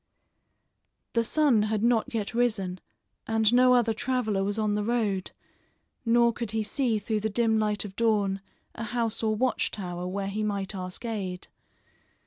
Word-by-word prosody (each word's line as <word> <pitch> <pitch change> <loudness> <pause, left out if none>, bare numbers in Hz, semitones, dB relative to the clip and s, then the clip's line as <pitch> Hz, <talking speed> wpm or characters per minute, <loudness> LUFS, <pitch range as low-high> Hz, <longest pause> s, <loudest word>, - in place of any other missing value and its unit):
The 230 - +2
sun 270 -2 +3
had 215 0 0
not 240 +2 +2
yet 225 -2 -2
risen 210 -7 0 0.5
and 225 0 +2
no 250 0 +6
other 235 -2 +3
traveler 220 -4 0
was 205 +2 -1
on 215 -1 +1
the 210 0 0
road, 210 -5 0 0.8
nor 235 0 +4
could 235 -1 -4
he 220 +1 0
see 230 +1 0
through 215 +1 -1
the 220 +1 -1
dim 220 0 +2
light 210 -1 0
of 195 -2 -9
dawn 205 -4 +1 0.3
a 230 - -6
house 230 -1 -1
or 220 -1 +1
watch 255 +3 +1
tower 180 -3 -5
where 195 +1 -3
he 210 +2 -3
might 200 -2 -2
ask 185 +4 -6
aid. 190 -5 -4
220 Hz, 165 wpm, -27 LUFS, 200-235 Hz, 0.8 s, no